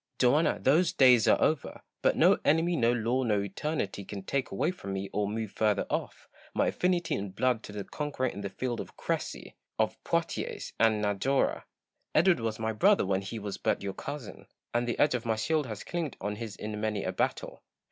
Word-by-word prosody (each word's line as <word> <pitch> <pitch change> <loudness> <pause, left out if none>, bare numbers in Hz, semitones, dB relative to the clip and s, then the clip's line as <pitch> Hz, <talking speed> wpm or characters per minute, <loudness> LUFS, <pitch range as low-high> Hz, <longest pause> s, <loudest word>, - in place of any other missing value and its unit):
Joanna, 140 +6 +3
those 160 +7 +3
days 125 -4 +6
are - - +5
over! 155 -4 0 0.2
But - - +2
no - - +5
enemy, 165 +3 +3
no 120 -5 +3
law, 120 +2 +1
no 110 -5 +2
eternity 100 +1 -3
can 100 0 -7
take 135 +6 -1
away 95 - 0
from 100 - -7
me, 95 0 -4
or 105 0 0
move 110 0 -3
further 105 -1 +1
off, - - -3 0.3
my - - +3
affinity 180 -2 0
in 100 0 -2
blood 120 +4 +1
to - - -9
the 105 -1 -5
conqueror 145 +2 -3
in 100 -5 -3
the 100 - -3
field 120 +2 -3
of - - -8
Crecy, - - -3 0.2
of - - -1
Poitiers, - - -2
and 110 -2 +3
Najora. 105 +7 +1 0.5
Edward 170 +2 +5
was 110 -1 -2
my 110 0 -1
brother 195 - +4
when 95 0 +1
he 100 +4 -6
was 105 -2 -5
but - - 0
your 100 -1 -3
cousin; 140 -7 -7 0.3
and 120 0 +1
the 120 - -1
edge 145 - +4
of 125 -2 -1
my 115 -2 0
shield 150 +5 0
has 110 -2 -6
clinked 165 -6 -3
on 105 +1 -3
his 110 -3 -6
in 105 0 -5
many 105 -2 -1
a - - -1
battle. - - -2
115 Hz, 205 wpm, -29 LUFS, 105-140 Hz, 0.5 s, days